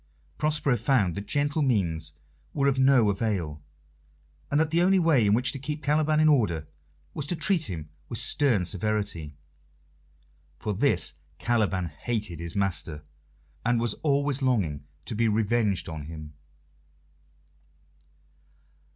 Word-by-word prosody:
Prospero 150 -4 +1
found 115 - +2
that 100 +3 -6
gentle 145 +4 0
means 85 - 0 0.4
were 140 - +1
of 135 -1 +2
no 130 -6 +5
avail, 95 -8 -2 0.9
and 145 - +2
that 160 -1 +1
the 170 +1 +3
only 190 +2 +4
way 160 - +4
in 100 - +4
which 125 +2 +2
to 135 - -7
keep 150 +3 -5
Caliban 155 +1 +2
in 155 - +5
order 105 - +2 0.5
was 145 - -4
to 175 - -1
treat 165 -1 +1
him 80 -4 -5 0.2
with 115 - -3
stern 120 -4 +3
severity. 100 -6 -2 1.2
For 105 - -3
this 100 - +1 0.2
Caliban 105 -6 0
hated 95 +2 -4
his 85 -1 -6
master, 85 -6 -2 0.6
and 120 0 +2
was 120 0 +1
always 140 -2 +1
longing 90 - 0 0.2
to - - -3
be 115 +1 +1
revenged 105 -3 +1
on 80 -3 -6
him. 75 -1 -9
115 Hz, 135 wpm, -27 LUFS, 90-140 Hz, 1.2 s, no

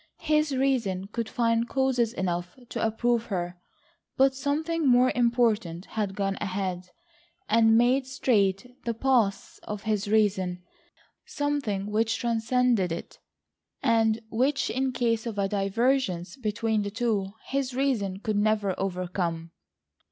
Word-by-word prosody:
His 305 -3 +2
reason 230 -9 0
could 230 0 -3
find 230 0 +1
causes 260 -4 +1
enough 180 -3 -3
to - - -3
approve 230 +1 +1
her, 175 -4 -4 0.6
but 270 0 +5
something 305 +4 -1
more 250 0 +5
important 230 -7 +1
had 205 -3 -3
gone 195 -1 -1
ahead, 185 -2 -3 0.6
and 225 0 +5
made 255 +3 +3
straight 210 -7 +1 0.2
the 235 -1 -2
paths 230 -5 +1
of 210 -1 -6
his 215 -2 -1
reason, 190 -4 +1 0.6
something 285 -10 -1
which 220 +2 0
transcended 235 -4 +1
it, 165 - -6 0.6
and 225 -3 +3
which 265 +5 +1
in 265 0 0
case 235 -2 0
of 220 -3 -5
a 200 -1 +1
divergence 195 -2 0
between 220 -3 -1
the 205 - -3
two, 205 -3 -1 0.2
his 270 -2 -1
reason 235 -9 0
could 215 -1 -1
never 210 -2 +1
overcome. 175 -3 -2
225 Hz, 130 wpm, -27 LUFS, 195-250 Hz, 0.6 s, but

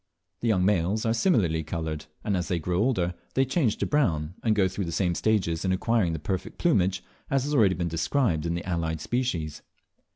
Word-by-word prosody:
The 120 - -2
young 95 -5 +3
males 100 +3 +1
are 115 - +2
similarly 105 - +2
coloured, 80 -1 -4 0.2
and 105 - 0
as 90 -1 -1
they 90 - 0
grow 90 +2 -1
older 100 -7 +1 0.2
they 135 - +3
change 135 -5 +1
to - - -1
brown, 85 - +1
and 110 -2 +2
go 100 -3 +3
through 95 +1 -3
the 85 - -4
same 90 +1 +1
stages 90 -5 0
in 95 - +1
acquiring 95 -2 +1
the - - -2
perfect 95 +5 -4
plumage 95 - +2 0.3
as 135 -1 +1
has 145 +2 -2
already 105 -9 +4
been 85 -1 -2
described 85 - 0
in 85 - -1
the 85 - -4
allied 80 -3 -1
species. 85 - -2
95 Hz, 205 wpm, -27 LUFS, 85-115 Hz, 0.3 s, already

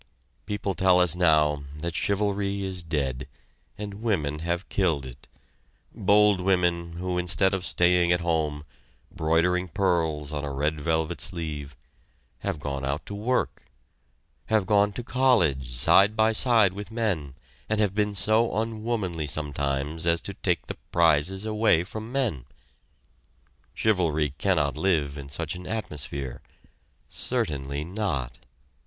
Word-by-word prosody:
People 105 -2 -2
tell 95 -1 +4
us 90 -2 +5
now 75 -4 +3
that 85 +2 -4
chivalry 100 -1 0
is 95 -1 -3
dead, 70 -6 -2 0.5
and 105 0 -7
women 75 -10 -1
have 85 +3 -2
killed 80 -9 0
it, 65 0 -11 0.7
bold 105 -1 +4
women 90 -2 +1
who 90 +1 -2
instead 90 +2 +3
of 95 -2 -2
staying 90 -1 +3
at 90 0 +2
home, 80 -3 -1 0.5
broidering 85 +3 +1
pearls 80 -5 0
on 75 -1 -3
a 70 - -3
red 75 +2 -1
velvet 80 +1 -1
sleeve, 75 -6 -4 0.6
have - - -3
gone 70 -1 -4
out 70 +3 -2
to - - -7
work 115 +5 -1 0.8
have 110 -3 +2
gone 105 +1 +3
to 120 - -6
college 105 - +2
side 95 - +5
by 110 0 +3
side 110 -4 +4
with 100 +1 -7
men 100 - -2 0.3
and 110 0 +1
have 105 -3 +2
been 105 0 0
so 110 +2 +2
unwomanly 110 -7 -2
sometimes 75 +1 -2
as 85 0 +3
to - - -6
take - - -1
the - - -7
prizes 85 +4 +2
away 105 -6 +3
from 110 +5 -7
men. 115 - -1 1.3
Chivalry 80 -9 +1
cannot 75 -8 +1
live 75 -5 0
in 70 0 -9
such 75 +2 -3
an 90 0 -8
atmosphere. 70 - -4 0.7
Certainly 70 0 -2
not! 85 - -3
85 Hz, 135 wpm, -26 LUFS, 75-100 Hz, 1.3 s, us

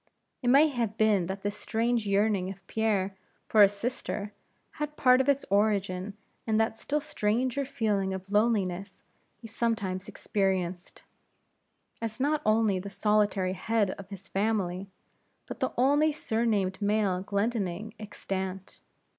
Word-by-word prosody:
It 245 - -3
may 280 +5 +7
have 230 -5 -2
been 210 -5 +3
that 195 +1 -5
this 205 0 -2
strange 230 0 -1
yearning 200 -2 +2
of 195 -1 -10
Pierre 200 -3 0 0.3
for 215 - +5
a 200 - +9
sister, 205 -1 -4 0.5
had 300 0 -3
part 255 -1 +5
of 265 - 0
its 280 0 +2
origin 200 -1 +1 0.3
in 220 -1 +2
that 225 0 +1
still 295 +6 -1
stranger 255 0 -1
feeling 215 -8 0
of 190 +1 -6
loneliness 200 -3 0 0.3
he 225 - -11
sometimes 210 -5 -2
experienced, 185 -3 -2 1.0
as 225 0 -4
not 295 +3 +1
only 215 -3 +3
the 200 +2 -6
solitary 205 -3 +1
head 205 +1 0
of 195 0 -9
his 195 -1 -9
family, 195 -2 -1 0.6
but - - -8
the - - +1
only 290 +5 +4
surnamed 220 -8 -1
male 205 -3 +1
Glendinning 200 0 -2
extant. 190 -2 -5
210 Hz, 140 wpm, -28 LUFS, 195-230 Hz, 1.0 s, a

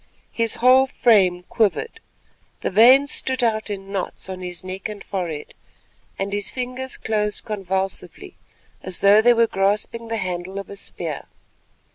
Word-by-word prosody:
His 230 -1 +1
whole 255 +2 +5
frame 190 -9 +3
quivered, 225 - -1 0.6
the - - -2
veins 255 +8 +6
stood 260 -1 +1
out 220 -2 0
in 195 -1 -6
knots 190 -1 -4
on 185 -1 -6
his 180 -1 -5
neck 185 +2 -5
and 210 -1 -8
forehead, 170 -6 -5 0.6
and 195 +1 -3
his 205 -1 -2
fingers 255 +1 -5
closed 210 -1 -2
convulsively 195 -3 -4 0.5
as 185 -2 -4
though 200 +2 +6
they 240 +1 +5
were 230 0 +4
grasping 210 +3 -1
the 225 0 -2
handle 185 -1 -4
of 200 - -6
a - - -7
spear. 165 -6 -6
205 Hz, 150 wpm, -22 LUFS, 190-230 Hz, 0.6 s, veins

